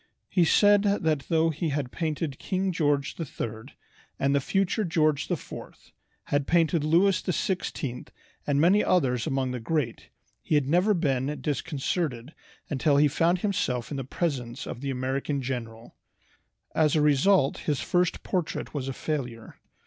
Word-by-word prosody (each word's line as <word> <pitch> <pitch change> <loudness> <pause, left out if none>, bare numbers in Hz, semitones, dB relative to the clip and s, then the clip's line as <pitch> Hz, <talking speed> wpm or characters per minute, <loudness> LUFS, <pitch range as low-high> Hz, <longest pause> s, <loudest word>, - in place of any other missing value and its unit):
He 175 -3 +3
said 205 +4 +5
that 160 -9 +1
though 165 0 +3
he 160 +1 -2
had 140 -3 -2
painted 155 -4 -3
King 190 0 -1
George 145 -4 0
III 115 -8 -6 0.4
and 140 0 +1
the 140 - +2
future 195 - 0
George 155 -4 +1
IV, - - -4 0.7
had 145 -1 -1
painted 165 -2 +2
Louis 175 +6 +3
XVI 175 -8 -2 0.4
and 145 -1 +2
many 185 +7 +5
others 125 -9 +1
among 135 -3 0
the 125 - -3
great, 120 -1 -2 0.3
he 155 - 0
had 145 -3 +2
never 180 +7 +3
been 140 -3 -1
disconcerted 145 - -2 0.3
until 145 0 +2
he 150 +1 +5
found 165 +5 +1
himself 130 - -1
in 145 - -3
the 135 - -3
presence 130 -4 -3
of 120 - -7
the 140 - -3
American 135 +2 -2
general. 120 -3 -5 0.8
As 155 -2 +3
a 155 - +3
result 150 +1 +3
his 145 - +1
first 180 0 0
portrait 180 -4 -3
was 140 -3 -3
a 135 - -3
failure. 125 -7 -5
150 Hz, 150 wpm, -27 LUFS, 135-170 Hz, 0.8 s, said